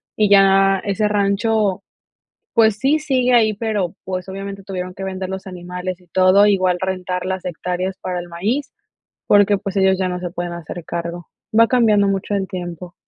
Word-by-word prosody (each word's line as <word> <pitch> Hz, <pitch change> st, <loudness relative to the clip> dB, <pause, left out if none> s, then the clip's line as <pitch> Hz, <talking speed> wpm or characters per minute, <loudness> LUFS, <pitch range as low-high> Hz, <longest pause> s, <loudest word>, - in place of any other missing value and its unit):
y 210 Hz, -1 st, +2 dB
ya 195 Hz, -1 st, +5 dB
ese 205 Hz, +1 st, 0 dB
rancho, 200 Hz, -1 st, +1 dB, 0.7 s
pues, 220 Hz, -2 st, +4 dB
sí 280 Hz, +5 st, +2 dB
sigue 255 Hz, -4 st, +1 dB
ahí, 220 Hz, -2 st, +4 dB
pero, 205 Hz, -5 st, -2 dB
pues, 185 Hz, 0 st, -4 dB
obviamente 195 Hz, 0 st, -6 dB
tuvieron 185 Hz, -1 st, -5 dB
que 195 Hz, -, -8 dB
vender 190 Hz, -1 st, -4 dB
los 190 Hz, 0 st, -6 dB
animales 180 Hz, 0 st, -6 dB
y 180 Hz, -, -23 dB
todo, 185 Hz, +3 st, +4 dB
igual 185 Hz, -3 st, +2 dB
rentar 185 Hz, -1 st, -3 dB
las 190 Hz, -1 st, -3 dB
hectáreas 180 Hz, +2 st, -3 dB
para 180 Hz, -1 st, -3 dB
el 175 Hz, -, -9 dB
maíz, 235 Hz, +12 st, -2 dB, 0.6 s
porque 205 Hz, -1 st, +5 dB
pues 195 Hz, 0 st, -6 dB
ellos 190 Hz, -1 st, +3 dB
ya 185 Hz, -1 st, 0 dB
no 180 Hz, 0 st, -4 dB
se 180 Hz, -1 st, -4 dB
pueden 175 Hz, 0 st, -5 dB
hacer 170 Hz, 0 st, -8 dB
cargo. 170 Hz, 0 st, -5 dB, 0.3 s
Va 230 Hz, -, +7 dB
cambiando 215 Hz, -5 st, +3 dB
mucho 195 Hz, +1 st, -1 dB
el 195 Hz, -1 st, -1 dB
tiempo. 175 Hz, -1 st, -7 dB
190 Hz, 180 wpm, -19 LUFS, 180-205 Hz, 0.7 s, Va